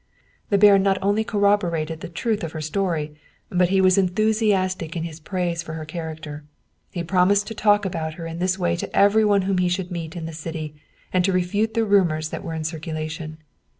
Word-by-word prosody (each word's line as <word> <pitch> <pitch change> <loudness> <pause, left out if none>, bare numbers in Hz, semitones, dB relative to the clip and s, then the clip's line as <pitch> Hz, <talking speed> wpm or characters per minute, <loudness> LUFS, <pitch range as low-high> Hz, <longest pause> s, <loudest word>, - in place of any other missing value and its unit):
The 200 - +3
baron 200 -1 +7
not 195 0 +2
only 205 +2 +2
corroborated 180 -7 +1
the - - -6
truth 210 +4 -2
of 165 - -4
her 160 - -5
story, 155 -1 -2 0.4
but 180 -1 +2
he 195 0 +3
was 185 0 +5
enthusiastic 190 -3 +1
in 165 - -2
his 165 -1 -7
praise 175 0 -2
of 170 - -14
her 155 -1 -6
charac 160 0 -6
ter. 150 -1 -8 0.5
He 175 - -4
promised 185 +4 +3
to - - -4
talk 205 -1 +3
about 160 -4 -3
her 165 - -7
in 165 +1 -6
this 185 +1 0
way 175 -2 0
to - - -5
everyone 205 -1 +4
whom 190 -1 0
he 180 0 +2
should 180 0 -2
meet 170 -1 -5
in 170 -2 -5
the 165 - -6
city, 155 -1 -6 0.4
and 185 -1 +3
to 195 - +2
refute 205 +5 0
the 225 -1 +2
rumors 170 -7 +2
that - - -6
were 165 -3 -4
in 160 - -3
circulation. 155 0 -5
180 Hz, 210 wpm, -23 LUFS, 160-200 Hz, 0.5 s, baron